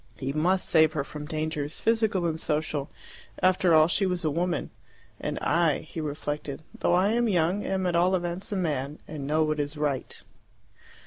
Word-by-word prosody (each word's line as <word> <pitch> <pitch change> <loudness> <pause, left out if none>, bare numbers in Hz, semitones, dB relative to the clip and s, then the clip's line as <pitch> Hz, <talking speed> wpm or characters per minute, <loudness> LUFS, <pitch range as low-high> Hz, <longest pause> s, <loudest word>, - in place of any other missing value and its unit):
He 135 0 -3
must 180 +5 +1
save 160 -1 +4
her 150 -4 -1
from 150 +1 -8
dangers, 155 -1 -3
physical 220 -5 +1
and 160 -1 -1
social, 150 -2 -1 0.5
for - - -1
after 185 -2 +4
all 155 0 +6
she 190 +3 +2
was 180 -2 -2
a 155 - +2
woman. 175 +3 -1 0.5
"And - - -3
I," 165 -2 +2
he 160 +1 -7
reflected, 145 -1 -4 0.2
"though 175 - +3
I 185 +3 +3
am 235 0 +2
young, 180 +2 +1
am 190 -1 -1
at 175 -1 +1
all 180 +2 +4
events 175 +2 -3
a - - -1
man, 150 -5 -2
and 145 -3 -6
know 155 +2 +2
what 155 -1 -1
is 145 +1 -2
right." 145 -3 -2
160 Hz, 190 wpm, -27 LUFS, 150-180 Hz, 0.5 s, all